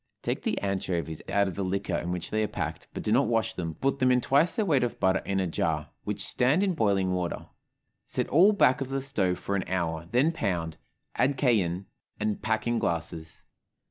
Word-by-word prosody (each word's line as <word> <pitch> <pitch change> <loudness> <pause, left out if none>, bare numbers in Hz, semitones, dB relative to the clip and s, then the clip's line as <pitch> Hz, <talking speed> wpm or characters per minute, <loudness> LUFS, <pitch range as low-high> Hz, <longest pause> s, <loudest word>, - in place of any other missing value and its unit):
Take - - -2
the - - -1
anchovies 90 -5 -2
out 100 0 +2
of 95 - -3
the 100 - -3
liquor 95 0 -2
in 85 +1 -2
which 90 -1 -4
they 110 - +1
are 105 - +1
packed, - - -5
but - - -6
do - - -1
not - - +4
wash 115 -1 +1
them, 85 -5 -4
put 135 - -1
them 130 -1 +4
in 125 - +4
twice 145 +7 +3
their 215 - +1
weight 145 -9 +3
of 120 - -2
butter 95 0 +2
in 95 -1 0
a 95 - +1
jar, 80 -2 -1
which - - -2
stand 140 +10 +2
in 195 -2 +1
boiling 100 - +1
water; 90 -1 -2 0.6
set - - -2
all 180 +9 +6
back 145 -9 +3
of 135 - -3
the 135 0 -2
stove 100 -10 0
for 100 - -3
an 95 - 0
hour, 85 -3 -2
then 135 +7 +3
pound, 85 - -2 0.4
add 135 +1 +2
cayenne, 100 - +1 0.3
and 105 -1 -1
pack 110 0 0
in 120 -1 +1
glasses. 80 -2 -3
100 Hz, 215 wpm, -28 LUFS, 90-130 Hz, 0.6 s, all